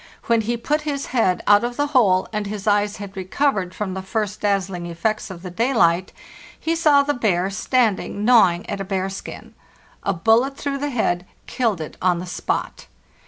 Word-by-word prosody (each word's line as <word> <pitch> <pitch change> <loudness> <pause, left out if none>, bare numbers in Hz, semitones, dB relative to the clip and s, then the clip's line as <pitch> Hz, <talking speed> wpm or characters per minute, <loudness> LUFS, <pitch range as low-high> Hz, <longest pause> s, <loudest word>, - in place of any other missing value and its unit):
When 230 -1 +2
he 235 +2 -2
put 300 +6 -1
his 285 -2 -3
head 190 -7 +2
out 205 +1 +5
of 240 0 -3
the 290 - +2
hole, 195 -8 +4
and 210 -1 -2
his 205 -1 -6
eyes 205 0 +2
had 200 -2 -8
recovered 190 0 -1
from 200 -3 -3
the 190 - -4
first 210 +1 -3
dazzling 195 -4 -1
effects 215 +6 -2
of 180 -2 -9
the 180 - -6
daylight, 185 -5 +2 0.5
he 330 +1 -1
saw 300 -4 +4
the 290 +1 0
bear 195 -6 0
standing 210 -2 0
gnawing 195 -8 +4
at 200 - -4
a - - -1
bear 190 -1 -2
skin. 195 - -9 0.5
A - - 0
bullet 225 +9 +2
through 280 -1 -3
the 290 +1 -2
head 185 -8 -1 0.2
killed 225 -8 -1
it 155 - -7
on 180 -2 +2
the 175 - -5
spot. 180 - -3
205 Hz, 190 wpm, -22 LUFS, 185-240 Hz, 0.5 s, out